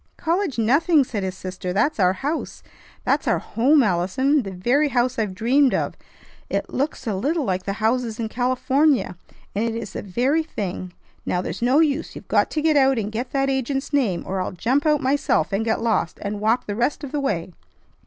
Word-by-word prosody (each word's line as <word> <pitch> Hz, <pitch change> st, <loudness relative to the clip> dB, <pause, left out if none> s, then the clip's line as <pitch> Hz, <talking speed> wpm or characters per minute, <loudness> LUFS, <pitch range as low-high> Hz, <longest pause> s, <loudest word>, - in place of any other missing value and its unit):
"College 340 Hz, -3 st, -1 dB
nothing!" 285 Hz, +7 st, +4 dB
said 225 Hz, -5 st, -4 dB
his 190 Hz, -1 st, -4 dB
sister. 185 Hz, -1 st, -5 dB
"That's 220 Hz, +8 st, +1 dB
our 185 Hz, -1 st, +4 dB
house. 290 Hz, -, -4 dB, 0.4 s
That's -, -, +1 dB
our -, -, +3 dB
home, 275 Hz, +5 st, +3 dB
Allison. 210 Hz, -, +1 dB
The 200 Hz, -, -6 dB
very 240 Hz, +11 st, +1 dB
house 250 Hz, -1 st, 0 dB
I've 205 Hz, -4 st, -1 dB
dreamed 260 Hz, +6 st, +3 dB
of. -, -, -1 dB, 0.6 s
It -, -, -2 dB
looks 280 Hz, +1 st, -2 dB
a 220 Hz, -, -1 dB
little 285 Hz, -, 0 dB
like 185 Hz, -2 st, -2 dB
the 195 Hz, -, -1 dB
houses 225 Hz, +1 st, -1 dB
in 225 Hz, -, -1 dB
California, 255 Hz, -1 st, +1 dB, 0.4 s
and 205 Hz, -, 0 dB
it 230 Hz, -1 st, -1 dB
is 230 Hz, -4 st, -6 dB
the -, -, -4 dB
very 250 Hz, -, +1 dB
thing. 185 Hz, -, -5 dB, 0.3 s
Now, 180 Hz, -, -1 dB
there's -, -, -5 dB
no 255 Hz, +6 st, +4 dB
use; 305 Hz, -1 st, 0 dB
you've -, -, -10 dB
got -, -, +2 dB
to 305 Hz, -, -2 dB
get 315 Hz, -1 st, +3 dB
out 270 Hz, -2 st, +4 dB
and 210 Hz, -1 st, -2 dB
get 240 Hz, +3 st, -3 dB
that 275 Hz, -1 st, +1 dB
agent's 270 Hz, +2 st, -2 dB
name, 225 Hz, -12 st, +1 dB
or 190 Hz, 0 st, -2 dB
I'll 185 Hz, -, -3 dB
jump 260 Hz, -, +1 dB
out 300 Hz, -2 st, +3 dB
myself, 260 Hz, -, +1 dB
and 200 Hz, +3 st, +1 dB
get 225 Hz, 0 st, 0 dB
lost, 220 Hz, -7 st, 0 dB
and 205 Hz, 0 st, -3 dB
walk 220 Hz, +4 st, +1 dB
the 205 Hz, -, -4 dB
rest 245 Hz, +7 st, -1 dB
of 280 Hz, -, -6 dB
the 295 Hz, -, -1 dB
way!" 190 Hz, -10 st, -2 dB
240 Hz, 205 wpm, -23 LUFS, 200-280 Hz, 0.6 s, nothing